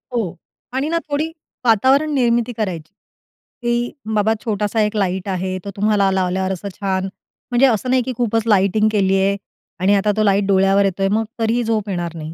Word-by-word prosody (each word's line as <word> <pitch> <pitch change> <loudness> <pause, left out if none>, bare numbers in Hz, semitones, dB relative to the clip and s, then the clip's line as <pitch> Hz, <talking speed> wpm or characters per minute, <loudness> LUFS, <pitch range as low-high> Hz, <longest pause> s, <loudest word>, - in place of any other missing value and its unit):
हो 215 -8 -1 0.4
आणि 270 +4 -1
ना 335 - +1
थोडी 305 +3 -1 0.3
वातावरण 265 +7 +3
निर्मिती 240 -2 +1
करायची 180 -7 -3 0.7
की 240 0 0 0.2
बाबा, 215 +1 +3
छोटासा 210 0 0
एक 210 +1 0
लाईट 190 -2 -1
आहे 185 0 -2
तो - - -4
तुम्हाला 205 -1 +2
लावल्यावर 190 0 0
असं 190 +2 -4
छान 190 -1 -1 0.5
म्हणजे 245 +2 +4
असं 245 +1 0
नाही, 255 0 +3
की 255 - -4
खूपच 225 -2 +1
लाइटिंग 210 +1 +3
केली 195 -2 +2
आहे 195 +1 +1 0.4
आणि 195 +3 +3
आता 205 +1 +2
तो 215 - +3
लाईट 200 -1 +3
डोळ्यावर 195 0 +4
येतोय 195 0 0
मग 220 +2 +2 0.2
तरीही 230 +2 +1
झोप 220 -2 -1
येणार 175 -3 -3
नाही. 160 0 -7
205 Hz, 180 wpm, -19 LUFS, 190-235 Hz, 0.7 s, म्हणजे